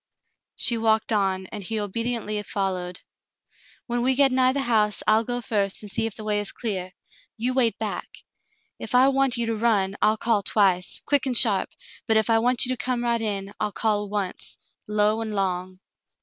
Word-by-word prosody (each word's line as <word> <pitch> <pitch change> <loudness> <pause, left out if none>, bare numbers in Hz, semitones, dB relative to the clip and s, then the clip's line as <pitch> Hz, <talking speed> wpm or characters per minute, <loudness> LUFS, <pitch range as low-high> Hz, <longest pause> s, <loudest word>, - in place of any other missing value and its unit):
She 235 -2 +1
walked 220 0 +2
on, 190 -2 0
and 210 -2 -6
he 220 +4 -3
obediently 215 0 -3
followed. 185 -3 -3 0.8
When 240 0 -2
we 260 +2 +2
get 275 0 +4
nigh 255 0 +3
the 275 +1 -1
house, 215 -4 +2
I'll 220 +1 +4
go 245 +1 -3
first 205 -3 -1
and 205 - -7
see 225 - 0
if 220 - -7
the 215 - -7
way 210 -1 0
is 205 - -1
clear. 190 -5 -4 0.4
You 245 +3 -1
wait 245 -3 +2
back. - - -4 0.7
If - - -4
I 260 +2 +6
want 270 -2 +1
you 235 - -1
to 225 0 -1
run, 210 -4 +1
I'll 215 +1 +3
call 220 -2 +1
twice, 190 -3 +1
quick 285 -2 +2
and 250 -2 +1
sharp, 205 -6 +4 0.4
but 220 -1 +3
if 220 +1 +1
I 225 - +4
want 245 +2 +2
you 255 +1 0
to 210 - -6
come 250 -1 -1
right 235 -1 0
in, 200 -2 -3
I'll 210 - -1
call 210 -1 0
once, 200 -3 -4 0.3
low 210 +1 +1
and 220 -2 -4
long." 185 -1 -2
220 Hz, 195 wpm, -24 LUFS, 200-240 Hz, 0.8 s, I